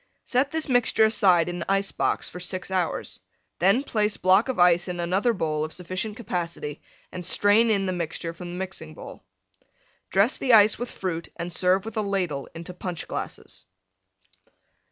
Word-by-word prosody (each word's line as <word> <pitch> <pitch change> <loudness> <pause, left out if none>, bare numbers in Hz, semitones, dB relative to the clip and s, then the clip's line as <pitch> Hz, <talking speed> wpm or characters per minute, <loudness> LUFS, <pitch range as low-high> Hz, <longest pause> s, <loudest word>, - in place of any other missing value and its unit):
Set 260 +2 +1
this 320 -1 -2
mixture 245 -4 +4
aside 185 -6 +4
in 175 -1 -3
ice 195 0 +1
box - - -1
for 180 - -8
6 185 +1 -4
hours. 185 -3 -2 0.4
Then 195 +9 +3
place 210 -6 0
block 190 +7 +4
of 260 - -2
Ice 175 0 +4
in 180 -1 -4
another 185 +7 +1
bowl 155 -7 -1
of 155 - -5
sufficient 185 +5 -4
capacity 170 - -4 0.3
and 180 - -6
strain 205 +6 +4
in 200 -3 +2
the 185 - -1
mixture 170 -1 -4
from 175 +1 -8
the 175 - -6
Mixing 180 -4 -6
bowl. - - -11 0.9
Dress 200 +6 +2
the 255 -3 +2
Ice 210 0 +5
with 245 0 -4
Fruit 170 -3 -4
and 170 +1 -5
serve 185 +3 +2
with 225 0 -7
a - - +2
Ladle 180 -9 -2
into 170 +2 -7
Punch 180 -2 -5
glasses. - - -7
185 Hz, 175 wpm, -25 LUFS, 175-210 Hz, 0.9 s, Ice